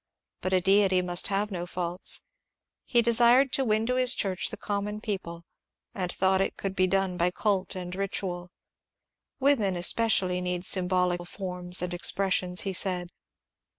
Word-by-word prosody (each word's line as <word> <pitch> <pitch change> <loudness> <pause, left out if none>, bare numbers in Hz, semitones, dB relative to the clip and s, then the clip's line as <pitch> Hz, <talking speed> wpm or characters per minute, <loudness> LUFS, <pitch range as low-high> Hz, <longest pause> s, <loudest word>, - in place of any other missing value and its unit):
But 185 - -2
a 185 - +4
deity 190 0 +3
must 175 0 -1
have 205 +1 -1
no 175 -2 -4
faults. 175 0 0 0.6
He 240 -2 +3
desired 240 +3 +4
to 270 - +1
win 215 -2 +1
to 250 +2 0
his 255 -1 +2
church 190 -2 -1
the - - -7
common 205 0 -3
people, 180 -6 -5 0.5
and 180 -2 -3
thought 190 0 +2
it - - -2
could 195 -1 -4
be 185 -1 +2
done 195 -1 0
by 175 +1 +2
cult 195 0 -1
and 180 -1 -6
ritual. 185 -2 -4 0.5
" - - -61
Women 255 -9 +2
especially 180 -1 +2
need 180 0 -2
symbolical 180 -1 +1
forms 180 -1 -2
and 180 0 -3
expressions," 180 0 +1
he 195 - -3
said. 180 -1 -3
190 Hz, 160 wpm, -27 LUFS, 180-205 Hz, 0.6 s, a